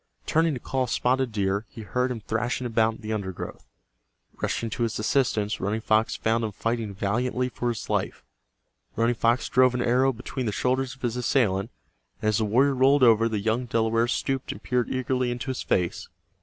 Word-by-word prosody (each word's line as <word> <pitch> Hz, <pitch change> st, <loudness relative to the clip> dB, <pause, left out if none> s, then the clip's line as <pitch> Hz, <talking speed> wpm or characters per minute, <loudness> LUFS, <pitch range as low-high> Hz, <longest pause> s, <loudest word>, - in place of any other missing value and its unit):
Turning 160 Hz, -1 st, +2 dB
to -, -, -5 dB
call 130 Hz, +1 st, -1 dB
Spotted 130 Hz, +1 st, +1 dB
Deer, 100 Hz, 0 st, -1 dB
he 115 Hz, -, -10 dB
heard 125 Hz, +5 st, 0 dB
him 120 Hz, -3 st, -4 dB
thrashing 115 Hz, +4 st, -2 dB
about 115 Hz, -1 st, +2 dB
in -, -, -15 dB
the 110 Hz, 0 st, -3 dB
undergrowth. 95 Hz, -4 st, -5 dB, 0.7 s
Rushing 115 Hz, -1 st, -1 dB
to -, -, -4 dB
his 115 Hz, -2 st, 0 dB
assistance, 110 Hz, -2 st, +1 dB
Running 105 Hz, +3 st, -1 dB
Fox 110 Hz, 0 st, +2 dB
found 115 Hz, +1 st, 0 dB
him 110 Hz, -, -2 dB
fighting 115 Hz, -2 st, -2 dB
valiantly 125 Hz, +6 st, -1 dB
for 120 Hz, 0 st, -2 dB
his 115 Hz, -4 st, -4 dB
life. -, -, -2 dB, 0.7 s
Running 115 Hz, +2 st, +2 dB
Fox 115 Hz, +1 st, +1 dB
drove 130 Hz, 0 st, +4 dB
an 125 Hz, -, 0 dB
arrow 130 Hz, +3 st, +3 dB
between 125 Hz, +1 st, -5 dB
the -, -, 0 dB
shoulders 130 Hz, +4 st, 0 dB
of 135 Hz, -, -25 dB
his 120 Hz, 0 st, -1 dB
assailant, 110 Hz, -5 st, +1 dB, 0.5 s
and 110 Hz, -, +1 dB
as 110 Hz, -, +1 dB
the 110 Hz, -, +1 dB
warrior 130 Hz, +7 st, +3 dB
rolled 135 Hz, +1 st, +4 dB
over 115 Hz, -1 st, +5 dB
the 110 Hz, -, -1 dB
young 115 Hz, +4 st, -1 dB
Delaware 115 Hz, 0 st, +1 dB
stooped 135 Hz, +2 st, -1 dB
and -, -, -10 dB
peered 125 Hz, -1 st, 0 dB
eagerly 130 Hz, -1 st, 0 dB
into 120 Hz, +2 st, -3 dB
his 130 Hz, -, -4 dB
face. 90 Hz, -2 st, -1 dB
120 Hz, 195 wpm, -26 LUFS, 110-125 Hz, 0.7 s, over